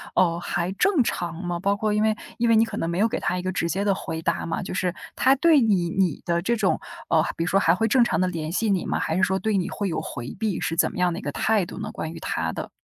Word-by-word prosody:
哦， 170 -2 +3
还 175 +1 -2
正 290 - +3
常 175 -6 -2
吗？ 175 -1 -2
包 200 +3 +1
括 215 0 -1
因 210 +1 +2
为 220 0 +2 0.2
因 235 - +1
为 230 - +5
你 220 - +6
可 220 -2 -6
能 165 - -1
没 170 +2 -2
有 220 - +4
给 - - -3
他 180 - -1
一 - - -2
个 185 +1 -2
直 175 -2 -1
接 195 +4 -1
的 200 -1 +2
回 160 -3 -5
答 - - -1
嘛， 165 - -2
就 - - -5
是 180 -2 0 0.2
他 265 +1 +4
对 320 +1 +5
你 195 -8 +2
你 180 -4 0
的 170 0 0
这 235 +7 +1
种， 210 -4 +1 0.3
呃 160 0 +3
比 165 - -1
如 - - -2
说 195 - +3
还 165 -4 +4
会 225 +5 +1
正 245 +2 +4
常 235 - +1
地 185 - +2
联 165 -3 -4
系 215 +5 0
你 190 -3 +1
吗？ - - -1
还 160 - -1
是 190 - +1
说 190 -2 +2
对 220 -1 0
你 180 - -1
会 200 -2 -2
有 165 - -2
回 120 -2 -6
避， 215 -4 -1
是 165 - -1
怎 - - +2
么 - - -7
样 180 -1 +3
的 170 - -4
一 - - -9
个 - - -3
态 215 -4 +1
度 - - -9
呢？ - - -5
关 160 - -5
于 165 - -8
他 80 - -2
的。 - - -5
185 Hz, 330 characters per minute, -24 LUFS, 170-215 Hz, 0.3 s, 你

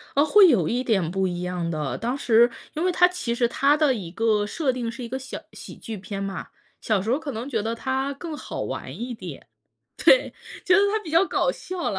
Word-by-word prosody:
啊， 285 - +5
会 380 +6 +7
有 200 - +3
一 245 +2 0
点 195 -10 0
不 190 0 0
一 175 -1 -4
样 180 -1 -3
的。 155 -4 -3
当 245 +4 -2
时 235 -2 +4 0.2
因 315 - -2
为 370 - +3
它 360 0 +5
其 355 -10 -3
实 240 0 +2
它 280 +4 +3
的 300 -3 +3
一 195 -8 -5
个 215 +1 +1
设 275 +3 0
定 245 -2 -3
是 235 +2 -7
一 235 - -6
个 260 +2 -3
小 265 0 -7
喜 - - -10
剧 225 -2 -7
片 195 +1 -5
嘛。 195 0 -5 0.3
小 215 -5 0
时 220 +4 -2
候 265 - +2
可 310 -3 -5
能 235 +3 -5
觉 225 -6 -1
得 225 +2 -2
它 265 +3 -2
更 315 +3 -7
好 - - -6
玩 - - -5
一 245 +1 -4
点， 225 - -9 0.5
对， - - +4 0.3
觉 370 -4 +4
得 - - +5
它 435 - +2
比 325 - -8
较 335 +4 +5
搞 - - +1
笑 370 -7 -4
啦。 195 - -3
240 Hz, 260 characters per minute, -24 LUFS, 210-295 Hz, 0.5 s, 会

